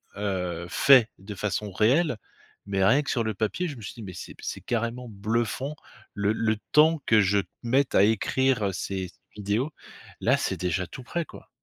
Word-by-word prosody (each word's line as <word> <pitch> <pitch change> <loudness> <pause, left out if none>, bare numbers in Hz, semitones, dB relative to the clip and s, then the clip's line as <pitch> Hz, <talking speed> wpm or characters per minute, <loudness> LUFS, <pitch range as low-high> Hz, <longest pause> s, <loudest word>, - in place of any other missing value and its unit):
heu, 90 -4 -3
fait 130 +1 +6
de 100 +2 -8
façon 105 +1 -2
réelle, 125 - +2 0.5
mais 95 -1 +1
rien 135 +9 +5
que - - -2
sur 115 - +1
le 110 - -1
papier, 115 - -1
je 145 - -7
me 115 - -10
suis 95 - -7
dit: 115 - -9
«Mais 95 -2 -7
c'est - - -8
p - - -16
c'est - - -4
carrément 120 +1 -2
bluffant, 115 +7 -2 0.4
le 100 0 +1
le 110 -1 0 0.2
temps 155 +1 +5
que 110 -2 +5
je 100 +1 +3 0.2
mette 130 +3 +2
à 100 - +7
écrire 110 0 +2
ces 95 0 -3
ces - - -20 0.3
vidéos, 105 +9 0 0.5
là, - - +3
c'est - - -1
déjà 90 0 -1
tout 130 - -10
prêt, 170 +6 -3
quoi». - - -14
110 Hz, 195 wpm, -26 LUFS, 100-130 Hz, 0.5 s, à